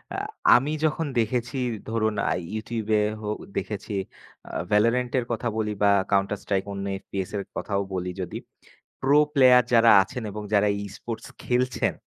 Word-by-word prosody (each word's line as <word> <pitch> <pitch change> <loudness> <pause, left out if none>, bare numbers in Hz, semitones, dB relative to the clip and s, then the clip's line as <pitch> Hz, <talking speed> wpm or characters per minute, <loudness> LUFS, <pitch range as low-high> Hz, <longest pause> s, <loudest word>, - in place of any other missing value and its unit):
আ - - -3 0.4
আমি 135 +5 +2
যখন 155 +1 0
দেখেছি 120 +4 -1 0.3
ধরুন 110 -1 0 0.2
আ - - +1 0.2
YouTube-এ 110 -1 -1 0.2
হো 105 - -4 0.3
দেখেছি। 105 +1 -4 0.6
আ - - -8 0.2
ভ্যালরেন্টের 120 +3 +2
কথা 120 +1 -2
বলি 105 -1 -1
বা 100 - +6 0.2
কাউন্টার 100 +1 +2
স্ট্রাইক 95 -2 0
অন্য 100 0 -4 0.2
FPS 95 -2 -5
এর 100 - -3
কথাও 100 -1 -1
বলি 90 0 -2
যদি। 90 - -5 0.6
প্রো 140 +2 +4 0.2
প্লেয়ার 125 -3 +7
যারা 115 0 +7
আছেন 125 +4 -7
এবং 105 +1 -6
যারা 105 0 +4 0.2
ই-স্পোর্টস 110 +3 -7 0.2
খেলছেন 125 0 0
110 Hz, 150 wpm, -25 LUFS, 105-125 Hz, 0.6 s, প্লেয়ার